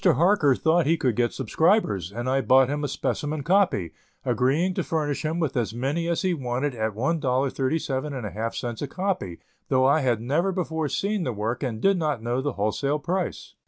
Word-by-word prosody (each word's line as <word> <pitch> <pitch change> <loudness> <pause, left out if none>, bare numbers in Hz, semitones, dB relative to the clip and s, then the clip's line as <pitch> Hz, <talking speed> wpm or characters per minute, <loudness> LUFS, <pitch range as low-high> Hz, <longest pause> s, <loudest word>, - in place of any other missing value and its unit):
Harker 170 -4 +4
thought 160 +1 +2
he 165 +2 +3
could 125 -7 0
get 120 +1 +1
subscribers, 125 - +1
and 120 +4 -4
I 135 +1 +2
bought 130 0 +5
him 145 +1 -2
a - - 0
specimen 150 +2 -2
copy, 170 - +2 0.3
agreeing 155 +9 +1
to - - -1
furnish 150 -3 -2
him 160 +2 -1
with 155 -6 -1
as 115 -2 -1
many 145 +7 -1
as 170 +2 0
he 185 -1 +2
wanted 130 -1 -2
at 110 -3 -2
$1.37½ 130 - -1
a 145 - -2
copy, 185 - -3 0.3
though 130 0 +3
I 140 +4 +4
had 125 -6 +1
never 150 +11 0
before 160 -4 -2
seen 205 +5 -1
the 125 - -1
work 110 +3 -3
and 120 -6 -3
did 195 - +3
not 150 -8 -1
know 120 +2 -1
the 145 +1 -2
wholesale 110 +8 0
price. 180 +5 -3
140 Hz, 185 wpm, -25 LUFS, 120-165 Hz, 0.3 s, bought